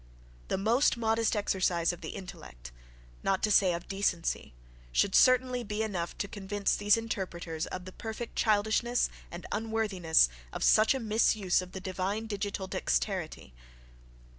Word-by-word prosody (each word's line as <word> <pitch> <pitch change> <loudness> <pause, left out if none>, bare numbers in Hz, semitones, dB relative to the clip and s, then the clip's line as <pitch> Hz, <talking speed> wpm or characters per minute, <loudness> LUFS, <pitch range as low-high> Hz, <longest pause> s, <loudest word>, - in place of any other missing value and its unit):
The - - -1
most 230 +7 +2
modest 225 0 +1
exercise 180 -4 +1
of 175 - -11
the 160 - -6
intellect, 60 - -10 0.5
not 195 -1 0
to 215 - +2
say 195 -3 +5
of 170 - -7
decency, 180 - -2 0.4
should 190 - +2
certainly 255 -1 +4
be 210 0 -2
enough 180 -6 -3
to 200 - -2
convince 200 0 -2
these 205 +1 +3
interpreters 175 -7 -4
of 185 -1 -6
the 185 - -8
perfect 225 +3 -7
childishness 220 +3 +1 0.2
and 175 +1 -8
unworthiness 210 - +2 0.2
of - - -4
such 220 +5 +5
a - - -2
misuse 215 -5 +2
of 180 0 -10
the 190 - -5
divine 190 +3 -3
digital 205 -2 -3
dexterity. - - -2
200 Hz, 145 wpm, -30 LUFS, 180-220 Hz, 0.5 s, say